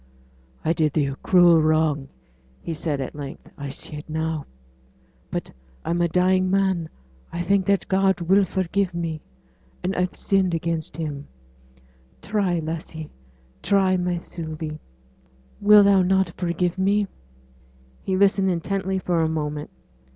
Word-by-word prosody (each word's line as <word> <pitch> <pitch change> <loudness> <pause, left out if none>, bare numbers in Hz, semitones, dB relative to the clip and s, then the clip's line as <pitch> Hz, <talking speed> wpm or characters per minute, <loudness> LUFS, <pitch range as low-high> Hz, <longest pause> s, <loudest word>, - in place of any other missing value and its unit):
'I 165 - +3
did 155 -3 +1
thee 150 -3 +2
a 140 0 -3
cruel 175 -3 +5
wrong,' 155 -3 +2 0.5
he 165 - -5
said, 155 -2 -2
at 135 - -4
length. 145 -2 -8
'I 140 -1 -6
see 140 +3 -6
it 150 - -10
now. 160 -1 -2 0.8
But - - -4 0.3
I'm 170 +1 0
a 170 - +3
dying 185 +2 +2
man. 190 -4 +1 0.4
I 175 - -3
think 195 +1 +2
that 200 -1 +2
God 190 -1 +2
will 190 +4 +4
forgive 190 0 -1
me 165 -2 -3 0.6
and 185 +2 -1
I've 180 0 -1
sinned 190 -3 +1
against 165 -1 -3
Him; 150 -3 -4 0.9
try, 195 -4 0
lassie 160 -1 -5 0.5
try, 195 -2 +3
my 180 -1 0
Sylvie 160 -2 -6 0.8
will 210 0 +7 0.2
not 190 +1 +3
thou 170 - -12
forgive 175 +1 -1
me?' 200 +2 +2 1.0
He 190 - -1
listened 195 0 +3
intently 190 +2 -1
for 175 -3 0
a 160 - +1
moment. 150 -2 -3
170 Hz, 140 wpm, -24 LUFS, 160-190 Hz, 1.0 s, will